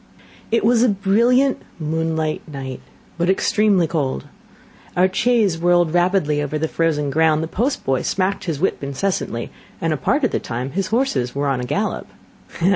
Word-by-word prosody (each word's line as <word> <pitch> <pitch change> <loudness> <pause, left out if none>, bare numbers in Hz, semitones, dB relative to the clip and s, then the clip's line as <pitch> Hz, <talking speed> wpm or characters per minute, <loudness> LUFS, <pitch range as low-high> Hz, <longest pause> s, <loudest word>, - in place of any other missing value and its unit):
It 230 -1 +1
was 235 0 +4
a 250 - +4
brilliant 235 +7 +2 0.2
moonlight 160 0 -1
night, 135 -2 -6 0.4
but 170 +1 +1
extremely 195 -1 +3
cold; 145 - -2 0.7
our 180 +1 +5
chaise 215 -7 +2
whirled 175 -1 +3
rapidly 175 -4 +2
over 150 +1 -2
the 160 +1 -1
frozen 155 -4 0
ground; 160 +1 +3
the - - -3
post 245 - -1
boy 135 -1 +1
smacked 195 +1 -1
his 160 -5 -2
whip 185 -4 -1
incessantly, 140 -4 -2 0.3
and 165 -1 0
a - - -2
part 280 - 0
of 250 - +2
the - - 0
time 125 +3 -4
his 195 +5 -1
horses 215 - 0
were 140 +1 0
on 135 -2 0
a - - -3
gallop. - - -2
165 Hz, 170 wpm, -20 LUFS, 145-200 Hz, 0.7 s, our